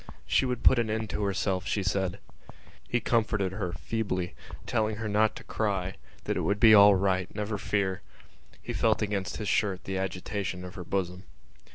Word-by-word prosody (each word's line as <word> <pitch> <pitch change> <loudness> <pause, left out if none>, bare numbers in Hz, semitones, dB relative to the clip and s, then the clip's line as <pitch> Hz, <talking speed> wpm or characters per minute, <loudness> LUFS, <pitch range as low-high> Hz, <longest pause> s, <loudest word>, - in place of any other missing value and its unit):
She 130 - +2
would 125 -2 -3
put 130 - +6
an 115 -2 0
end 110 -1 -2
to - - -2
herself, 95 -2 -1
she 100 - 0
said. 95 -1 -1 0.7
He 120 - +2
comforted 110 -5 +1
her 95 -3 -3
feebly, 95 -1 -3 0.3
telling 110 -1 0
her 110 +1 -4
not 105 +1 +2
to - - -9
cry, 100 -3 -1 0.3
that - - -1
it - - 0
would 100 +1 0
be 110 0 +8
all 100 -1 +8
right, 95 -1 +1
never 105 0 -3
fear. 95 -2 -1 0.6
He - - -4
felt - - +2
against 100 -1 -2
his 105 - -4
shirt 95 -2 0
the 95 -1 -3
agitation 95 0 -3
of 90 - -9
her 90 - -7
bosom. 90 0 -2
100 Hz, 185 wpm, -28 LUFS, 95-110 Hz, 0.7 s, be